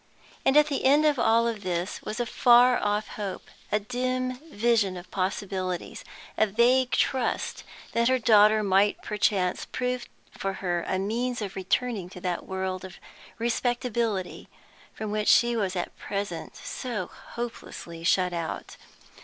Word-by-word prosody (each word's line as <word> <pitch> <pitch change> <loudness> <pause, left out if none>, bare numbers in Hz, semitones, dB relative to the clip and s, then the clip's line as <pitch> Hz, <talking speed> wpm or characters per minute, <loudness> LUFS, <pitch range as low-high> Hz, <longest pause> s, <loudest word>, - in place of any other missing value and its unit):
And 270 +2 +4
at 300 - +7
the 290 -2 -2
end 290 +3 +5
of 295 -4 +3
all 230 +1 +3
this 185 -3 -3
was 220 - -5
a 240 - +1
far 245 +2 +5
off 210 +1 0
hope, 200 -3 -6 0.2
a 210 - +3
dim 255 +3 -2 0.2
vision 210 -5 +2
of 175 0 -11
possibilities, 185 -1 -3 0.3
a 220 - +4
vague 245 +5 +3
trust 260 -2 0 0.3
that 235 0 +2
her 260 0 +4
daughter 215 -3 +5
might 200 +1 +2
perchance 195 -3 0
prove 250 0 -3 0.3
for 195 0 -2
her 175 -3 -2
a 190 - 0
means 240 +6 -1
of 200 -3 -5
returning 195 0 -1
to 180 - -11
that 180 -1 -3
world 190 -1 -3
of 185 -1 -9 0.4
"respectability" 235 -4 -1 0.4
from 215 -1 -5
which 215 0 -1
she 240 0 +5
was 195 -4 -1
at 175 - -3
present 200 -4 -4
so 235 -8 -4
hopelessly 175 -8 -8
shut 180 +1 +2
out. 170 -2 -5
210 Hz, 145 wpm, -27 LUFS, 190-240 Hz, 0.4 s, at